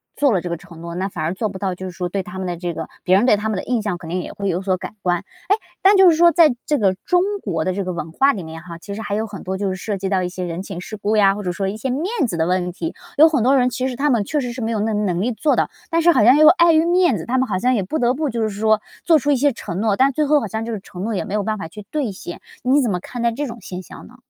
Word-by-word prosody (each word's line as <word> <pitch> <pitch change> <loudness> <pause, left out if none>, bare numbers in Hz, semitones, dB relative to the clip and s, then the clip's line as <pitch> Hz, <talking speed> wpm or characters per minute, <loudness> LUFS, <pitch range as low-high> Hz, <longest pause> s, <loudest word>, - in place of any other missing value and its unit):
做 285 -3 +3
了 185 - +2
这 175 - -5
个 170 - -1
承 165 0 -14
诺， 170 0 -7
那 190 +2 -1
反 160 -4 -5
而 165 +3 -1
做 215 +2 -2
不 190 -1 -8
到， 190 -2 -2
就 185 +1 -7
是 185 - -5
说 180 0 -4
对 195 0 -2
他 205 -1 -9
们 185 - -3
的 175 - -2
这 175 -1 -3
个 160 0 -5 0.2
别 185 - +4
人 205 +5 +4
对 245 - +5
他 215 +1 -3
们 210 - -1
的 - - -3
印 240 -3 -1
象 205 -4 -2
肯 165 -2 -10
定 180 +1 -1
也 - - -7
会 200 -1 -4
有 175 +2 -1
所 190 -1 0
改 185 +2 -8
观。 175 -1 +1
诶， 405 - -2 0.3
但 390 +1 +6
就 380 -2 +8
是 325 - +4
说， 340 +1 +6
在 305 -5 +5
这 300 - +1
个 195 -3 +3
中 360 -1 +3 0.2
国 165 -6 -1
的 185 - 0
这 200 0 -2
个 185 - -3
文 160 -1 -5
化 275 +9 +4
里 190 - -5
面 160 0 -8
哈， 170 -2 -9
其 200 +4 -8
实 220 - -6
还 205 - -4
有 220 +2 -1
很 200 -3 -9
多 190 +1 -3
就 200 0 -2
是 185 - -2
涉 200 +1 -4
及 190 +1 -3
到 190 -2 +1
一 180 - -2
些 185 0 -6
人 170 +1 -4
情 195 -3 -7
世 215 +4 -7
故 210 +2 0
呀， 195 -1 +5
或 205 - -6
者 180 - -1
说 195 +2 -2
一 195 - -3
些 220 +5 -4
面 280 +7 -1 0.2
子 175 -7 -4
的 160 +1 +1
问 180 -1 0
题。 325 - -5 0.2
有 315 - +8
很 295 -8 +1
多 270 +2 +4
人 250 0 +3
其 255 +1 -2
实 250 - -5
他 290 +1 +1
们 230 -5 +2
确 295 +8 -1
实 245 -3 -3
是 250 - -6
没 225 +1 -1
有 215 - -1
那 220 +1 0
能 195 -4 0
力 245 +4 0
做 295 +6 +1
的， - - +1 0.2
但 335 -1 +2
是 345 +1 +6
好 210 - +4
像 255 +6 +7
又 310 0 +7
碍 340 0 +6
于 320 +1 +4
面 350 - +3
子， 160 - -6
他 255 +2 0
们 260 - +2
好 185 -3 -1
像 255 +3 +2
也 200 - 0
不 310 +12 -3
得 245 0 +2
不 295 +1 -2
就 230 -1 -2
是 215 - +1
说 215 +1 +1 0.2
做 325 -3 +5
出 290 +3 0
一 - - +4
些 285 +3 +3
承 185 -6 -6
诺， 215 -3 +2
但 270 +1 +4
最 305 - +1
后 295 +1 +4
好 225 - -4
像 220 +3 -4
就 230 - -4
是 215 - -3
承 185 -1 -9
诺 225 - -2
也 205 - -2
没 205 - -6
有 210 -1 0
办 215 0 -2
法 165 - -6
去 205 +4 -11
兑 280 -9 -1
现， 175 -2 -8 0.2
你 270 +4 +3
怎 240 - 0
么 180 -3 -1
看 245 +4 -7
待 235 0 +2
这 290 +4 -3
种 235 -2 -7
现 180 0 -7
象 - - -12
呢？ - - -17
210 Hz, 380 characters per minute, -20 LUFS, 185-260 Hz, 0.3 s, 就